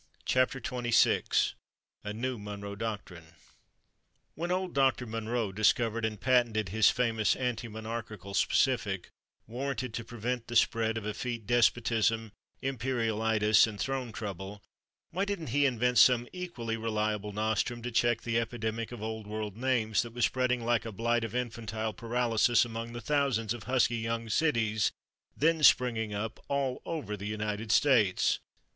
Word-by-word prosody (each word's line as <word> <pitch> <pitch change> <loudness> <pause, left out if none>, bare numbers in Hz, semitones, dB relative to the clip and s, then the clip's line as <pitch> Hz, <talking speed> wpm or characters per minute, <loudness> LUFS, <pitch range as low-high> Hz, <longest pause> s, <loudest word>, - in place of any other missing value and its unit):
A 125 -4 0
NEW 120 +2 -3
MONROE 100 0 -6
DOCTRINE 95 -7 -6 1.0
When 170 +3 -3
Old 185 0 -1
Doctor 135 -2 +2
Monroe 115 -1 -2
discovered 110 +2 +2
and 110 -2 -3
patented 115 -5 +2
his 110 +3 +5
famous 115 -3 +1
anti 120 -2 -2
monarchical 110 -3 -6
specific, 105 -6 +1 0.4
warranted 130 0 -4
to 115 - -4
prevent 120 +1 -4
the 120 - -6
spread 115 0 +2
of 110 - -5
Effete 115 +1 -4
Despotism, 115 -1 +2 0.3
Imperialitis 110 -4 +2
and 105 -2 -7
Throne 135 -3 -2
Trouble, 100 -1 -6 0.5
why 185 +4 -1
didn't 200 -8 -3
he 140 +4 +3
invent 125 -1 +2
some 120 -1 +6
equally 135 -12 -4
Reliable 105 -2 -1
Nostrum 110 +3 -1
to 125 - -3
check 120 0 +2
the 115 0 +1
epidemic 115 -1 -3
of 120 -3 -7
Old 110 -1 -5
World 105 -1 -4
names 115 -4 +1
that 120 -1 -7
was 120 -1 +2
spreading 125 -2 0
like 120 -1 +2
a 115 - -6
blight 115 +3 0
of 115 - -5
infantile 110 -3 -3
paralysis 120 0 +2
among 115 0 -6
the 120 - -6
thousands 125 -5 +1
of 120 -4 -9
husky 125 -2 +2
young 115 0 -3
cities 110 -5 +1 0.5
then 160 +1 +2
springing 120 -6 +4
up 105 +2 -4
all 135 -2 -1
over 145 -11 -3
the 100 0 -6
United 105 0 -3
States? 115 -11 +3
115 Hz, 140 wpm, -30 LUFS, 110-125 Hz, 1.0 s, some